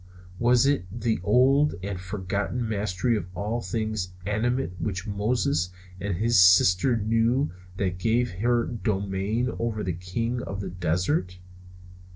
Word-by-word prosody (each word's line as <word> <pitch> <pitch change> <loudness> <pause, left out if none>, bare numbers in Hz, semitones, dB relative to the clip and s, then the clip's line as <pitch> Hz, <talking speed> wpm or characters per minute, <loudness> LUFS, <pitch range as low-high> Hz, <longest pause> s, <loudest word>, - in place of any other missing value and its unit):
Was 120 +1 +4
it 140 -9 +2
the 115 +1 -1
old 135 +8 +4
and 100 -2 -4
forgotten 100 +5 -3
mastery 105 +1 0
of 100 -5 -3
all 110 +4 -2
things 110 -2 -3
animate 120 +4 0
which 95 +1 -3
Moses 110 +1 0 0.3
and 100 -3 -2
his 115 +1 +3
sister 90 +6 +5
knew 115 +6 +1 0.3
that 90 -2 -1
gave 115 +4 +1
her 120 +1 +2
dominion 105 +1 -1
over 115 -2 -2
the 90 - -1
king 115 +8 -3
of 100 -4 -5
the 100 - -5
desert? 90 - -1
110 Hz, 135 wpm, -26 LUFS, 95-120 Hz, 0.3 s, sister